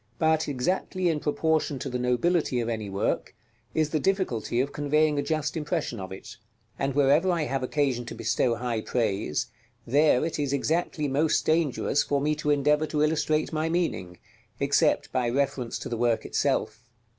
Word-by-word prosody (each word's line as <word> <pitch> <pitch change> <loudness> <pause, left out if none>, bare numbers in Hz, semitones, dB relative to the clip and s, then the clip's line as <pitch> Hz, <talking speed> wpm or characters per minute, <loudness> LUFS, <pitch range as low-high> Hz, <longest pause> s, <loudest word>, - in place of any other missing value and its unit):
But 160 0 +2
exactly 180 +6 -1
in 155 -2 0
proportion 155 -1 0
to - - -5
the 125 0 -3
nobility 125 +3 +1
of 115 - -2
any 110 -3 -3
work, 95 0 -2 0.4
is 155 -1 +1
the 155 - +1
difficulty 145 - 0
of 140 +2 -1
conveying 150 0 +2
a - - +2
just 155 -1 -2
impression 150 - -2
of 95 -1 -7
it; 95 - -9 0.4
and 135 0 -1
wherever 145 +6 +4
I 170 -3 +1
have 135 -2 -2
occasion 130 -2 0
to - - -6
bestow 120 -2 +1
high 120 -2 -2
praise, 105 -9 -1 0.4
there 145 +2 +3
it 165 - -3
is 140 -1 -1
exactly 155 +2 0
most 145 +3 +1
dangerous 155 -3 +1
for 140 - 0
me 150 +2 +1
to 150 -1 -2
endeavor 150 +2 +2
to 150 -1 0
illustrate 155 0 +1
my 155 +1 0
meaning, 165 - -2 0.4
except 140 0 +2
by 125 -2 0
reference 130 -2 -1
to - - -6
the 115 - -3
work 120 -1 +1
itself. 110 +2 -1
145 Hz, 175 wpm, -27 LUFS, 125-155 Hz, 0.4 s, wherever